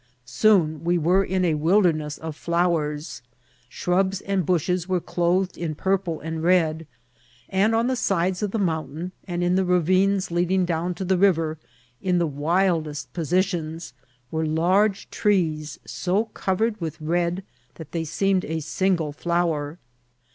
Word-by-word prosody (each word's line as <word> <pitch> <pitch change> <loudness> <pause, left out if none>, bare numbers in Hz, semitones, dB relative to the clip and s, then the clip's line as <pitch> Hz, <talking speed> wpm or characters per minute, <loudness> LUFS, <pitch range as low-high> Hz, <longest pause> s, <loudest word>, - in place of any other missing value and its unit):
Soon 160 - +2
we 175 +1 +2
were 180 +4 +3
in 185 -1 0
a 165 - +2
wilderness 155 -2 +2
of 160 -1 -6
flowers; 160 -6 -1 0.5
shrubs 190 +6 0
and 195 -4 -1
bushes 180 +1 0
were 185 -1 +2
clothed 180 +2 0
in 160 -3 -3
purple 190 -2 -1
and 160 0 -4
red; 165 -2 +2 0.6
and 200 +4 +2
on 230 +1 +2
the 260 +1 +1
sides 185 -5 0
of 210 - 0
the 225 - -2
mountain, 165 -2 -2 0.2
and 175 -1 -2
in 175 0 +2
the 190 +1 +3
ra« 180 0 +3
vines 185 +2 +2
leading 180 +2 +1
down 175 +1 -1
to 190 - -4
the 185 0 +1
riy^r, 165 -5 +2 0.4
in 180 -1 +1
the 170 - +2
wildest 155 -3 0
posi* 175 +3 +2
tions, 165 -6 -5 0.4
were 160 0 -1
large 185 +6 +2
trees 160 -7 0
so 190 +5 0
covered 210 +2 -1
with 160 -1 -4
red 170 +3 -1 0.3
that 160 -3 -10
they 165 -1 -2
seemed 190 +4 +1
a 160 +1 -2
single 165 0 0
flower. 165 -1 -1
175 Hz, 155 wpm, -24 LUFS, 160-190 Hz, 0.6 s, were